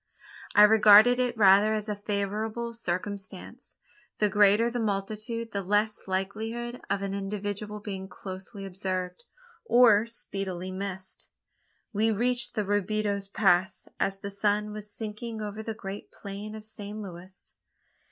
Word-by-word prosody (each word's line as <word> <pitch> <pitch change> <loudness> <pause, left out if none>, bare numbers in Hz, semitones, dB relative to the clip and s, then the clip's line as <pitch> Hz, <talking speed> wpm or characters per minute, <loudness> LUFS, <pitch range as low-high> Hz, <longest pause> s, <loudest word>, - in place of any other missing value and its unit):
I 210 - +9
regarded 215 +3 +8
it 245 -2 0
rather 205 +1 +6
as 215 0 -3
a 210 - -2
favourable 210 +3 -2
circumstance. 195 -2 -5 0.4
The 210 - +2
greater 210 +3 +4
the 245 - -2
multitude, 215 +2 -3
the 200 - -2
less 210 +3 0
likelihood 220 +6 -3
of 200 0 0
an 195 0 -2
individual 205 +1 -4
being 195 -2 -6
closely 190 +1 -8
observed, 185 - -4 0.4
or 235 - +5
speedily 190 -5 -4
missed. 190 0 -4 0.6
We 215 +2 +2
reached 240 +2 +1
Robideau's 205 0 0
Pass 190 -2 +2
as 195 0 0
the 200 +1 -6
sun 210 +1 0
was 210 0 -5
sinking 220 +1 -6
over 210 0 -5
the 220 0 -5
great 200 -1 -7
plain 205 +1 -7
of 215 -1 -9
San 215 -1 -7
Luis. 185 0 -11
205 Hz, 130 wpm, -28 LUFS, 195-220 Hz, 0.6 s, I